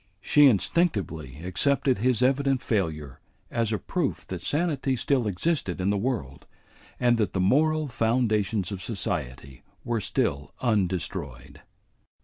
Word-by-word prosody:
She 145 +8 +5
instinctively 95 - 0
accepted 130 +6 +1
his 125 +1 +2
evident 135 -1 +2
failure 80 - -2 0.3
as 115 -2 0
a 110 - +1
proof 165 - -2
that 90 -2 -5
sanity 145 - 0
still 125 -1 +1
existed 100 - -1
in 95 +2 +1
the - - +1
world, 100 - -3 0.5
and 120 -2 +3
that 105 -4 0
the 95 - -1
moral 155 +10 +2
foundations 110 -5 0
of 95 -2 -5
society 70 - -4 0.2
were 115 -2 -1
still 70 -5 -2
undestroyed. 90 - -2
110 Hz, 130 wpm, -26 LUFS, 90-130 Hz, 0.5 s, She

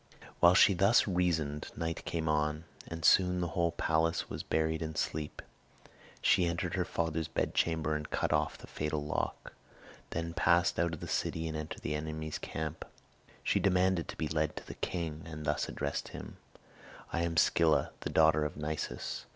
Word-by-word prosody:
While 85 +1 +7
she 100 - +7
thus 100 +6 +4
reasoned 80 -6 0
night 80 0 -3
came 80 -1 -2
on, 75 0 +1 0.2
and 85 0 -5
soon 90 0 +5
the 85 -1 -1
whole 85 -1 +1
palace 80 0 0
was - - -3
buried 80 0 0
in 80 -1 -4
sleep. 75 -1 -3 0.8
She 90 -2 +4
entered 85 0 -2
her - - 0
father's 80 -1 -1
bedchamber 80 -2 0
and 75 -1 -4
cut - - 0
off - - +1
the - - -11
fatal 75 -1 -3
lock; 75 - -3 0.6
then 85 0 -3
passed 85 +1 +3
out 85 -1 +1
of - - -13
the - - -5
city 80 0 -1
and 80 - -4
entered 75 0 -6
the 75 - -1
enemy's 80 0 -4
camp. 80 0 -4 0.6
She - - +2
demanded 90 -2 +2
to - - -7
be 80 - -1
led 75 -1 0
to - - -8
the - - -7
king, 80 -3 -3
and 75 -2 -7
thus 75 -2 0
addressed - - -3
him: - - -9 0.8
"I 85 - +1
am 85 -1 -1
Scylla, 80 0 +4
the - - -4
daughter 80 -1 +4
of 75 - -3
Nisus. 75 -4 -4
80 Hz, 175 wpm, -32 LUFS, 75-85 Hz, 0.8 s, While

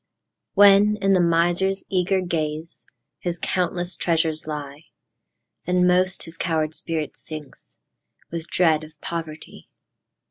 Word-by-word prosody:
When, 205 +1 +6
in 195 0 +2
the 185 - +4
miser's 175 +3 +2
eager 190 0 +1
gaze, 160 -2 -4 0.3
His 175 -1 -3
countless 175 0 -1
treasures 160 -2 0
lie, 150 0 -6 0.8
Then 180 0 +3
most 180 +1 +3
his 165 0 -8
coward 160 -2 -1
spirit 160 -2 -3
sinks, 155 -3 -5 0.5
With 165 0 -5
dread 160 -3 +2
of 155 -1 -14
poverty. 160 -2 -7
170 Hz, 115 wpm, -23 LUFS, 155-180 Hz, 0.8 s, When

